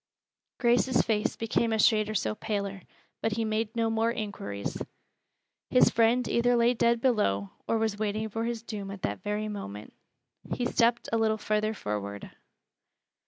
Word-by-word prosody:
Grace's 245 +1 +3
face 220 +1 0
became 225 0 0
a 220 - +2
shade 215 -1 +4
or 215 - -3
so 205 - 0
paler, 200 -3 -3 0.4
but 225 - 0
he 225 +1 -1
made 220 0 -1
no 230 -1 +1
more 225 +1 +1
inquiries. 200 - -4 0.9
His 250 - +5
friend 235 +2 +3
either 245 +1 +3
lay 235 +1 +4
dead 235 0 +2
below, 100 - +1 0.2
or 225 - +2
was 220 -2 -1
waiting 215 +1 -1
for 225 +2 -3
his 230 -1 -3
doom 205 -4 -6
at 195 -1 -8
that 100 0 -2
very 210 +1 -2
moment. 105 - -7 0.6
He 245 - -1
stepped 235 0 +2
a 225 - +3
little 220 -1 +2
farther 215 +1 0
forward. 100 - -5
220 Hz, 165 wpm, -28 LUFS, 205-230 Hz, 0.9 s, His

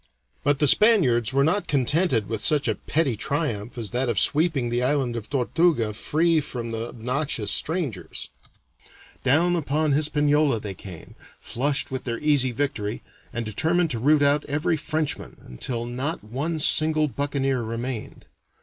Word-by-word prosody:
But 145 -1 +2
the 150 +1 +2
Spaniards 130 - +4
were 135 +1 +3
not 185 +7 +1
contented 140 - +1
with 110 -2 -4
such 145 +2 +1
a - - +2
petty 145 -6 -1
triumph 120 -3 -3
as 115 -3 -5
that 125 +1 0
of 115 - -1
sweeping 150 -5 +1
the 120 +1 0
island 130 -2 0
of 110 -2 -6
Tortuga 135 -3 +1
free 160 +8 +1
from 120 -5 -5
the 115 +1 -3
obnoxious 125 -2 -2
strangers; 155 - -3 0.9
down 170 +7 +3
upon 155 -1 0
Hispaniola 150 -2 +2
they 105 -2 -5
came, 90 -3 -11 0.3
flushed 140 +3 -1
with 130 0 -4
their 120 -2 -2
easy 145 -3 +3
victory, 115 -5 -3 0.3
and 120 -1 -3
determined 160 - +1
to 115 - -2
root 145 +4 +4
out 145 +1 +3
every 150 +4 0
Frenchman, 155 -1 -3
until 115 - -4
not 130 +7 -3
one 140 +10 -3
single 155 0 +3
buccaneer 135 -2 -1
remained. 115 +1 -5
140 Hz, 150 wpm, -24 LUFS, 120-155 Hz, 0.9 s, Spaniards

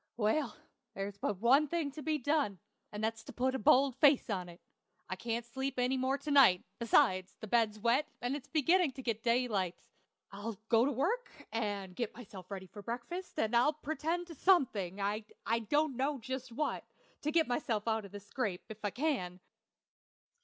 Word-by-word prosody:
Well, 235 +4 +1 0.4
there's 200 0 -5
but 205 - -1
one 265 +9 +5
thing 315 -2 -1
to 305 +2 -8
be 310 0 0
done, 285 -7 0 0.3
and 210 +1 -5
that's 225 0 -1
to - - -8
put 260 +1 0
a 265 - -1
bold 260 +4 +5
face 280 -5 +5
on 180 -3 -2
it. 170 +1 -13 0.5
I 185 - -3
can't 230 +3 -3
sleep 265 +2 -4
any 250 +1 +2
more 260 +1 +1
to 300 - -5
night; 255 -11 +6 0.2
besides, 185 -5 +3
the - - -6
bed's 215 -1 +2
wet, 240 +7 +2
and 245 +3 -1
it's 285 -2 -7
beginning 330 0 +3
to 265 - -8
get 225 -3 -1
daylight. 230 -7 +1 0.6
I'll 205 +2 -5
go 230 +1 +5
to 285 - +1
work 385 - 0 0.2
and 205 -5 -3
get 235 -1 -3
myself 200 -6 -11
ready 195 -2 -6
for 205 +2 -11
breakfast, 245 - -6
and 220 +2 +1
I'll 250 +6 +4
pretend 315 +3 -2
to 340 - -10
something 230 - +2
I 215 +3 -2
don't 295 -2 +2
know 275 +3 0
just 260 +1 -5
what 300 +6 -2 0.4
to 300 - -1
get 325 0 +3
myself 235 -4 -1
out 220 -1 +1
of 200 - -11
this 205 -1 -9
scrape, 205 -5 -3
if 220 0 -10
I 205 - +1
can.... 225 - -1
240 Hz, 190 wpm, -33 LUFS, 210-280 Hz, 0.6 s, night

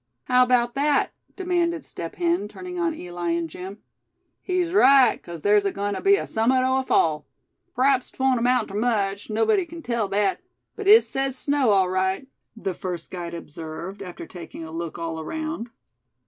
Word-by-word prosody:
"How 250 0 +3
about 245 -1 +3
that?" 285 +1 +2 0.2
demanded 345 -4 -1
Step 165 - -7
Hen, 340 - 0
turning 360 - -7
on 335 -2 0
Eli 175 - -5
and 170 0 -1
Jim. 190 +6 -9 0.6
"He's 365 -2 -1
right, 270 - +6
'cause 170 -2 -9
thar's 205 +2 +4
agoin' 200 +1 -2
ter - - -4
be 395 0 +5
summat 250 +3 +2
o' 260 +1 +2
a - - -2
fall. 155 - +1 0.5
P'raps 260 0 +2
'twon't 265 -2 +1
amount 245 -1 +2
ter - - -9
much, 205 -2 -1
nobody 295 - +2
kin 335 -1 -10
tell 235 -4 -1
that; 200 - 0 0.3
but 420 -2 -5
it 435 +3 +9
sez 270 -1 -1
snow, 285 -4 +1
all 195 -2 +4
right," 190 +5 0 0.3
the 195 -4 -3
first 175 -2 -6
guide 170 -2 -5
observed, 165 +4 -7
after 180 -3 -8
taking 170 -2 -9
a 160 - -8
look 165 0 -5
all 165 -1 -4
around. 310 - -4
225 Hz, 175 wpm, -24 LUFS, 185-280 Hz, 0.6 s, it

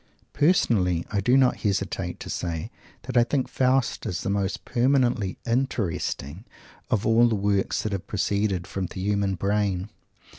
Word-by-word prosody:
Personally, 105 - +2
I 100 -2 0
do 125 +6 +4
not 130 -2 +4
hesitate 95 -3 -2
to - - -7
say 85 +5 -3 0.3
that 130 0 -6
I 120 - +6
think 130 +1 -1
Faust 130 -1 +1
is 90 - -3
the 100 - -1
most 100 -1 -2
permanently 125 -5 +1
interesting 105 - -2 0.5
of 105 - 0
all 115 +2 +5
the 115 - +1
works 100 -1 0
that 110 - -2
have 100 -2 -4
proceeded 100 -2 0
from 95 -2 -4
the 95 - -8
human 100 0 0
brain. 100 +1 -1
100 Hz, 155 wpm, -25 LUFS, 95-120 Hz, 0.5 s, I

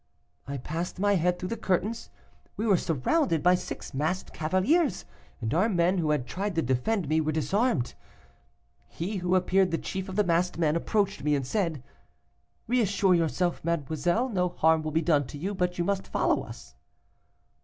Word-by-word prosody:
"I 140 0 -4
passed 160 +7 -4
my 205 +2 +2
head 180 -1 +1
through 180 +1 -5
the - - -2
curtains. 205 +5 -1 0.5
We 220 - -1
were 205 -4 +5
surrounded 165 - +1
by 180 +1 +6
six 180 - -4
masked 155 +7 -2
cavaliers, 185 - +1 0.3
and 115 +2 -2
our 190 +8 +3
men, 180 -1 +2
who 160 -3 0
had 150 -5 +1
tried 195 +6 -3
to 165 - +1
defend 135 - 0
me, 155 +2 +2
were 155 0 0
disarmed. 160 - 0 0.9
He 195 +5 -4
who 180 0 +1
appeared 185 +1 +3
the 165 - 0
chief 190 +2 -5
of 185 - -6
the 210 - +3
masked 175 -1 +1
men 155 -2 +2
approached 195 -3 0
me, 150 0 +2
and 135 -2 -2
said; 160 - -1 0.8
'Reassure 200 -5 +2
yourself, 175 +1 0
mademoiselle, 170 - 0
no 180 -5 0
harm 160 -1 +3
will 155 - -3
be 160 +2 0
done 150 -5 +2
to 145 - -8
you, 190 +7 -3
but 180 -2 -1
you 175 - +1
must 195 +1 -1
follow - - +1
us. - - -11
175 Hz, 180 wpm, -27 LUFS, 155-195 Hz, 0.9 s, by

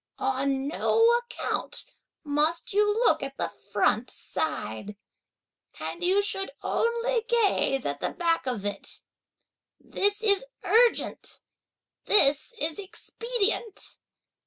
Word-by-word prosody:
On 270 +1 -1
no 455 +9 +3
account 480 0 -4 0.4
must 315 +9 0
you 415 +1 +3
look 455 +4 +2
at - - -6
the - - -2 0.2
front - - +1
side; 200 - -4 0.8
and 350 - -5
you 385 +3 +3
should 390 -1 +1
only 470 +1 0
gaze 405 - +1
at 145 0 -3
the - - -1
back 335 -5 -1
of 230 -6 -3
it; 200 -1 -5 0.8
this 410 +2 -1
is 405 0 +4 0.2
urgent, 470 +1 +2 0.6
this 290 - +5
is 315 +1 -2
expedient! 445 +2 -2
390 Hz, 110 wpm, -26 LUFS, 275-450 Hz, 0.8 s, this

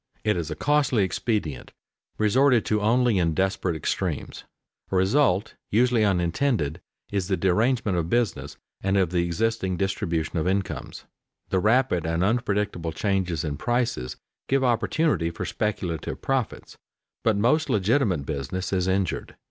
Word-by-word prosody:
It 105 -1 +2
is 85 -3 -3
a 75 - -4
costly 145 -6 +2
expedient, 95 - -2 0.4
resorted 120 +3 +3
to 105 -1 +1
only 115 -1 +3
in 85 -3 +1
desperate 95 -2 0
extremities. 80 - -3 0.5
A - - 0
result 100 +1 +2 0.2
usually 120 +1 +3
unintended 90 - 0 0.3
is 100 -3 -1
the 95 -2 0
derangement 110 +2 +1
of 85 0 -3
business 120 -5 -1 0.2
and 95 +1 +1
of 95 -3 +2
the 90 -1 +1
existing 95 +1 -1
distribution 85 -4 -1
of 80 - -1
incomes. 95 +1 -2 0.5
The 95 - +2
rapid 110 -5 +2
and 85 +2 0
unpredictable 105 -6 0
changes 95 -5 -1
in 75 -2 -3
prices 120 - -1 0.3
give 135 0 +2
opportunity 125 - +1
for 85 - -5
speculative 90 -7 -3
profits, 135 -4 -3 0.4
but 110 -3 +2
most 140 +10 +2
legitimate 100 - +1
business 80 +7 -3
is 90 -1 +1
injured. 95 -2 -1
100 Hz, 140 wpm, -25 LUFS, 85-115 Hz, 0.5 s, resorted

